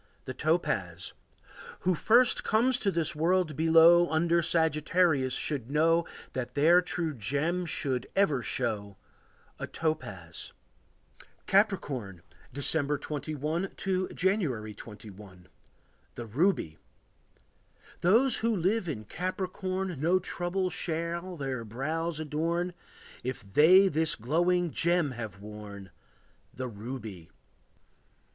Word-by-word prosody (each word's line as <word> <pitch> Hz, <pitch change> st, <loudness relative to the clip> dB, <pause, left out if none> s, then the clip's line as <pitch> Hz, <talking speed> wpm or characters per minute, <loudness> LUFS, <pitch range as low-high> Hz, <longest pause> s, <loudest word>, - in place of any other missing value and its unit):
The 130 Hz, -, -5 dB
Topaz. 100 Hz, -, -1 dB, 0.7 s
Who 185 Hz, -, +2 dB
first 235 Hz, +8 st, +3 dB
comes 245 Hz, +4 st, +2 dB
to 200 Hz, -, +1 dB
this 165 Hz, -3 st, 0 dB
world 170 Hz, 0 st, +1 dB
below 165 Hz, +2 st, +6 dB
Under 170 Hz, +2 st, +2 dB
Sagittarius 160 Hz, -3 st, +2 dB
should 135 Hz, -6 st, -2 dB
know 165 Hz, +3 st, +3 dB, 0.3 s
That 125 Hz, -1 st, -4 dB
their 165 Hz, +5 st, +5 dB
true 170 Hz, -3 st, -2 dB
gem 150 Hz, -, -1 dB
should 130 Hz, -5 st, -2 dB
ever 155 Hz, -10 st, +2 dB
show 100 Hz, -5 st, -3 dB, 0.6 s
A -, -, -4 dB
topaz. 105 Hz, -, -4 dB, 0.9 s
Capricorn. 140 Hz, -, 0 dB, 0.3 s
December 145 Hz, +2 st, +1 dB
21 155 Hz, +4 st, -3 dB
to 185 Hz, -1 st, -1 dB
January 155 Hz, -, -1 dB
21. 100 Hz, -4 st, -12 dB, 0.7 s
The 120 Hz, -, -6 dB
Ruby. 115 Hz, -, 0 dB, 1.2 s
Those 230 Hz, +8 st, +4 dB
who 230 Hz, 0 st, +1 dB
live 190 Hz, +1 st, 0 dB
in 110 Hz, -8 st, -5 dB
Capricorn 185 Hz, -, -3 dB
No 175 Hz, +4 st, +3 dB
trouble 185 Hz, 0 st, -2 dB
shall 170 Hz, +2 st, -3 dB
their 135 Hz, -4 st, -3 dB
brows 155 Hz, +8 st, -3 dB
adorn 165 Hz, +4 st, -1 dB, 0.5 s
If 120 Hz, -6 st, -6 dB
they 185 Hz, +6 st, +7 dB
this 160 Hz, -2 st, +1 dB
glowing 175 Hz, +8 st, +1 dB
gem 170 Hz, -3 st, +2 dB
have 110 Hz, -5 st, -7 dB
worn, 100 Hz, -2 st, -9 dB, 0.6 s
The 130 Hz, 0 st, -5 dB
ruby. 110 Hz, -6 st, -8 dB
160 Hz, 105 wpm, -29 LUFS, 125-180 Hz, 1.2 s, they